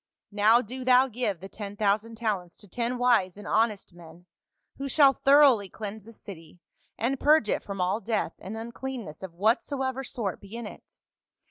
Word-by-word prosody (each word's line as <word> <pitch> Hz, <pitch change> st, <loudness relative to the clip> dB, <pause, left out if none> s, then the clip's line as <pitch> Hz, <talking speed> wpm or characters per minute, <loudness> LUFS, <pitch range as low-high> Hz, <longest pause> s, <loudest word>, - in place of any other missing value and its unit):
Now 215 Hz, +4 st, +4 dB
do 255 Hz, +4 st, -7 dB
thou 255 Hz, +1 st, +5 dB
give 220 Hz, -7 st, -3 dB
the 195 Hz, -, -7 dB
ten 205 Hz, 0 st, -8 dB
thousand 215 Hz, +2 st, 0 dB
talents 205 Hz, -6 st, -3 dB
to 205 Hz, -, -15 dB
ten 240 Hz, +5 st, -3 dB
wise 230 Hz, -7 st, +2 dB
and 205 Hz, 0 st, -10 dB
honest 215 Hz, -4 st, 0 dB
men, 170 Hz, 0 st, -15 dB, 0.5 s
who 275 Hz, 0 st, -4 dB
shall 275 Hz, 0 st, +5 dB
thoroughly 270 Hz, -8 st, +5 dB
cleanse 210 Hz, 0 st, -7 dB
the 230 Hz, -, -12 dB
city, 175 Hz, -5 st, -12 dB, 0.4 s
and 250 Hz, +4 st, -1 dB
purge 300 Hz, -7 st, +4 dB
it -, -, 0 dB
from 200 Hz, -1 st, -7 dB
all 185 Hz, +4 st, 0 dB
death 220 Hz, -7 st, -1 dB
and 210 Hz, +4 st, -7 dB
uncleanness 235 Hz, -6 st, -7 dB
of 185 Hz, -3 st, -8 dB
whatsoever 260 Hz, -, 0 dB
sort 220 Hz, -7 st, -4 dB
be 200 Hz, +3 st, -11 dB
in 235 Hz, -1 st, -6 dB
it. -, -, -12 dB
220 Hz, 175 wpm, -27 LUFS, 200-250 Hz, 0.5 s, thou